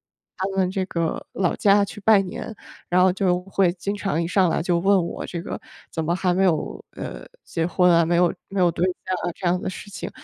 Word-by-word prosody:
到 195 +1 -6
他 - - -4
们 185 -1 +2
这 190 0 -1
个 170 -3 -2
老 185 -3 0
家 200 0 +4
去 210 - -9
拜 210 -1 +5
年， 195 +3 -6 0.4
然 180 +1 +4
后 185 0 +5
就 185 -2 +1
会 190 -1 +1
经 195 +3 -3
常 195 -5 -1
一 165 - -1
上 185 0 +3
来 - - 0
就 175 +1 +1
问 195 -1 +3
我 - - -5
这 170 - -5
个 - - -5 0.3
“怎 160 - -2
么 170 +2 +1
还 180 -1 +1
没 190 +2 +2
有， 170 -5 0
呃， - - -7 0.2
结 165 -1 -2
婚 180 +1 +3
啊， 170 -1 +5
没 170 +1 +1
有 175 0 +4 0.2
没 195 - -3
有 180 -1 +5
对 170 +2 0
象 185 0 -2
啊” - - -4
这 185 - -3
样 180 +1 +2
的 - - -5
事 195 +2 -8
情。 200 - -6
180 Hz, 265 characters per minute, -23 LUFS, 175-195 Hz, 0.4 s, 拜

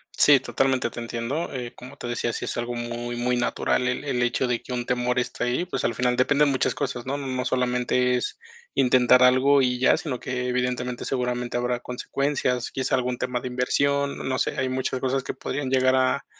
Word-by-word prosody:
Sí, 145 -2 +6
totalmente 130 -2 0
te 120 - -8
entiendo. 120 +7 -3
Eh, 125 -2 -5
como 125 +3 -11
te 120 - -6
decía, 120 0 -2
sí - - -4
es - - -4
algo 120 +1 -2
muy, 120 0 -4
muy 125 +1 0
natural 125 +1 0
el 125 +3 -1
el 125 -4 0
hecho 120 +1 +1
de 120 -1 -1
que 125 - -7
un 120 -1 -2
temor 125 0 0
esté 125 - -3
ahí, 125 +9 0
pues 135 -8 -3
al 120 - +1
final 125 +1 +1
dependen 145 +3 +3
muchas 130 - +1
cosas, 130 -3 -3
¿no? 140 +2 -2
No 130 -2 -3
solamente 125 0 +1
es 125 - -3 0.3
intentar 125 0 +5
algo 135 +2 +5
y 125 -1 +1
ya, 130 - +5
sino 130 -6 -4
que 125 -1 -3
evidentemente 125 0 -2
seguramente 125 -2 -2
habrá 125 0 -1
consecuencias, 125 0 -2
quizá 130 0 0
algún 125 -1 -1
tema 125 -1 -2
de - - -4
inversión, 140 +3 0
no 130 0 -1
sé, - - -1
hay 130 0 0
muchas 130 0 -2
cosas 130 0 0
que - - -4
podrían 140 -3 -3
llegar 130 0 +3
a, 130 0 +1
125 Hz, 210 wpm, -25 LUFS, 125-130 Hz, 0.3 s, Sí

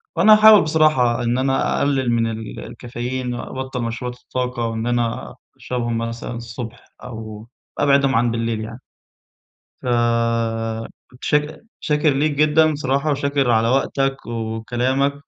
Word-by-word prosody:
وأنا 215 - +6
هاحاول 215 -1 +8
بصراحة 155 -7 +2
إن 120 +1 0
أنا 135 0 +1
أقلل 135 -4 +1
من 115 -1 +1
ال 110 -1 -7
الكافيين، 125 +2 -5
وأبطّل 130 +1 -5
مشروبات 125 +2 -5
الطاقة، 125 -2 -3
وإن 115 +1 -3
أنا 120 -1 -2 0.2
أشربهم 120 -2 -3
مثلًا 115 +1 -4
الصبح، 115 0 -8 0.2
أو 110 -2 -8 0.3
أبعِدهم 140 -1 +3
عن 120 0 +2
بالليل 115 -1 -2
يعني. 115 +3 -7 1.0
فمتشك 115 - -1 0.2
شاكر 150 0 +1
ليك 145 +3 +1
جدًا 155 +2 +3
بصراحة، 140 +1 0
وشاكر 140 -2 +1
على 115 0 +3
وقتك 135 0 0
وكلامك 120 +4 -1
125 Hz, 120 wpm, -20 LUFS, 115-140 Hz, 1.0 s, هاحاول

